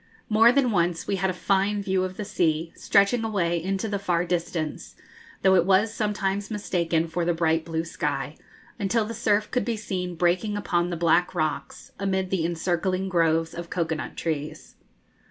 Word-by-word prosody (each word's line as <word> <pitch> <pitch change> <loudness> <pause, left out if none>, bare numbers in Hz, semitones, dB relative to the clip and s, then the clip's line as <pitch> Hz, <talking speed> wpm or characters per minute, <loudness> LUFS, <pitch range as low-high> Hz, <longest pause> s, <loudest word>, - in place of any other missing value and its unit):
More 225 +2 +6
than 255 -2 +2
once 175 -3 0
we 195 - -1
had 190 +1 0
a - - +1
fine 195 +2 0
view 190 -1 +1
of 185 0 -4
the 210 - -4
sea, 165 -4 0
stretching 200 +4 +3
away 175 -6 0
into 195 +3 -1
the 200 -1 -2
far 175 -3 0
distance, 170 -3 -3 0.5
though 190 -1 +6
it 180 -3 +5
was 195 +4 +3
sometimes 205 -2 -1
mistaken 170 -6 0
for 170 +2 -2
the 170 0 +1
bright 165 -1 +1
blue 165 -1 -2
sky, 145 -3 -3 0.4
until 215 +2 +1
the 230 - -5
surf 210 -2 +1
could 250 - +1
be 235 -2 -2
seen 180 -4 -4
breaking 180 +5 +1
upon 175 -3 0
the 175 - -3
black 170 +2 +2
rocks, 155 -2 -3
amid 190 -1 -1
the 185 -4 +1
encircling 180 +2 -1
groves 165 -2 +2
of 170 0 -7
cocoa 165 -2 -1
nut 155 - -6
trees. 155 -2 -4
180 Hz, 180 wpm, -25 LUFS, 170-200 Hz, 0.5 s, More